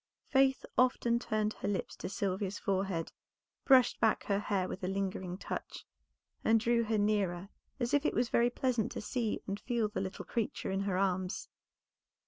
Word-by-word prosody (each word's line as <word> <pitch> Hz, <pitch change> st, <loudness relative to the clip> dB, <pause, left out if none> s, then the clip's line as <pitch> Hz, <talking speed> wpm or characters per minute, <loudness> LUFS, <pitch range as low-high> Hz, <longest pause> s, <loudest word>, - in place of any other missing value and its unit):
Faith 270 Hz, -1 st, +3 dB
often 240 Hz, -2 st, +3 dB
turned 215 Hz, -2 st, -1 dB
her -, -, -5 dB
lips 200 Hz, -3 st, -2 dB
to -, -, -5 dB
Sylvia's 195 Hz, 0 st, -2 dB
forehead, 190 Hz, -4 st, -1 dB, 0.5 s
brushed 260 Hz, -3 st, +5 dB
back 220 Hz, -1 st, +2 dB
her 200 Hz, -1 st, +1 dB
hair 195 Hz, -3 st, 0 dB
with 185 Hz, +1 st, -6 dB
a -, -, 0 dB
lingering 190 Hz, -2 st, -2 dB
touch, -, -, -6 dB, 0.6 s
and 225 Hz, 0 st, +5 dB
drew 235 Hz, +1 st, +2 dB
her 220 Hz, 0 st, +1 dB
nearer 200 Hz, -3 st, 0 dB, 0.3 s
as 240 Hz, -1 st, -1 dB
if 290 Hz, 0 st, +4 dB
it -, -, 0 dB
was 240 Hz, -, +1 dB
very 235 Hz, +1 st, +3 dB
pleasant 245 Hz, -3 st, 0 dB
to -, -, -4 dB
see 225 Hz, 0 st, -2 dB
and 200 Hz, +1 st, -3 dB
feel 230 Hz, -1 st, 0 dB
the 210 Hz, -, -3 dB
little 190 Hz, +1 st, -5 dB
creature 225 Hz, -4 st, -2 dB
in 195 Hz, -, 0 dB
her 195 Hz, -2 st, 0 dB
arms. 185 Hz, -1 st, -1 dB
210 Hz, 175 wpm, -33 LUFS, 190-235 Hz, 0.6 s, brushed